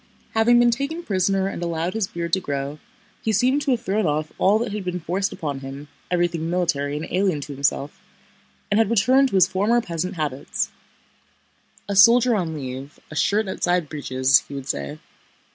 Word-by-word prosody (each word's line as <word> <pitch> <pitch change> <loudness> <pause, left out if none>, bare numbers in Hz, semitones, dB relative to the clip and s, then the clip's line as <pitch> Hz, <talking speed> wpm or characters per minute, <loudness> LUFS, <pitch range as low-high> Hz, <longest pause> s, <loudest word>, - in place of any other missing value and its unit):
Having 225 +2 +4
been 240 0 +5
taken 280 +8 -3
prisoner 195 - +1
and 195 - -5
allowed 170 +1 -2
his 220 -3 -1
beard 170 -1 -5
to 190 - +4
grow, 140 -3 -4 0.4
he 220 - 0
seemed 255 +7 +2
to 285 - -2
have 245 -3 +2
thrown 215 -3 0
off 155 +1 -1
all 200 +3 +4
that 230 -1 -2
had 210 -1 -4
been 180 -1 -3
forced 185 +4 -1
upon 145 -4 -4
him—everything 160 +5 -3
military 150 -5 0
and 155 - -4
alien 185 -4 +1
to 145 +1 -7
himself—and 140 +8 -4
had 225 -3 +3
returned 255 +5 +4
to - - -3
his 185 -2 +6
former 210 +6 +2
peasant 180 -3 -3
habits. 145 -4 -2 1.2
"A 200 - -2
soldier 235 +4 +6
on 170 -7 -1
leave—a 135 +2 -8
shirt 205 +6 +1
outside 180 -4 0
breeches," 135 -2 +2
he 140 - -8
would 135 -1 -6
say. 145 - -3
180 Hz, 175 wpm, -23 LUFS, 150-215 Hz, 1.2 s, his